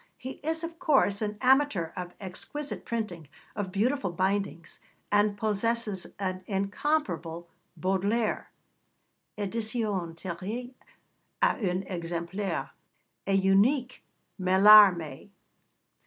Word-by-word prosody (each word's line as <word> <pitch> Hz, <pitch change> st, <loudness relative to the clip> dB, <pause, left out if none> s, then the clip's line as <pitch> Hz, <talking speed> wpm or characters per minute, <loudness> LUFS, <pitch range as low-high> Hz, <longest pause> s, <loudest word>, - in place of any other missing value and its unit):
He 260 Hz, +2 st, -8 dB
is, 320 Hz, +2 st, -1 dB
of 330 Hz, 0 st, -6 dB
course, 265 Hz, -, +2 dB
an 210 Hz, -1 st, -2 dB
amateur 260 Hz, -, +3 dB
of 180 Hz, -1 st, -6 dB
exquisite 245 Hz, +10 st, -6 dB
printing, 200 Hz, -9 st, -4 dB, 0.3 s
of 205 Hz, -3 st, -3 dB
beautiful 220 Hz, +1 st, 0 dB
bindings, 190 Hz, -1 st, -2 dB, 0.3 s
and 205 Hz, 0 st, +3 dB
possesses 215 Hz, -2 st, 0 dB
an 185 Hz, -1 st, -3 dB
incomparable 195 Hz, -, -1 dB, 0.3 s
Baudelaire 200 Hz, +4 st, 0 dB, 0.9 s
(édition 210 Hz, -4 st, -2 dB
tirée 205 Hz, +9 st, -5 dB, 0.7 s
à -, -, +3 dB
un 185 Hz, -3 st, -1 dB
exemplaire), 175 Hz, +2 st, -4 dB, 0.6 s
a 195 Hz, -, +1 dB
unique 205 Hz, +7 st, +2 dB, 0.4 s
Mallarmé. 190 Hz, -4 st, +6 dB
200 Hz, 95 wpm, -28 LUFS, 185-235 Hz, 0.9 s, Mallarmé